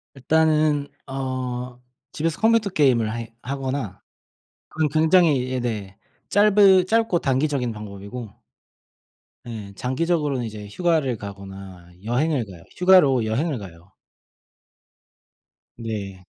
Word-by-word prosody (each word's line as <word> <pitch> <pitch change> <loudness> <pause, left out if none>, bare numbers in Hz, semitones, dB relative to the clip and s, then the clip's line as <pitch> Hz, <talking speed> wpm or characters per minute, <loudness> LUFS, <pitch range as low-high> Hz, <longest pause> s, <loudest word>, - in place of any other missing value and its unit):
일단은 155 +1 +2 0.2
어 130 -2 -4 0.3
집에서 160 +1 -2
컴퓨터 225 -2 +3
게임을 125 - +2
해 115 -1 -7
하거나 130 -6 -4 0.7
그건 155 -1 0
굉장히 155 -4 +3
예네. 110 -6 -3 0.3
짧은 200 -2 +5
짧고 225 -3 +2
단기적인 135 -3 0
방법이고 105 +1 -9 1.1
네. 110 -4 -7
장기적으로는 140 - -1
이제 105 -2 -7
휴가를 155 - 0
가거나 95 -3 -10 0.2
여행을 125 +3 0
가요. 90 -4 -13
휴가로 180 -10 +5
여행을 135 +7 -1
가요. 90 -3 -12 1.8
네. 100 -5 -6
130 Hz, 240 characters per minute, -23 LUFS, 110-155 Hz, 1.8 s, 짧은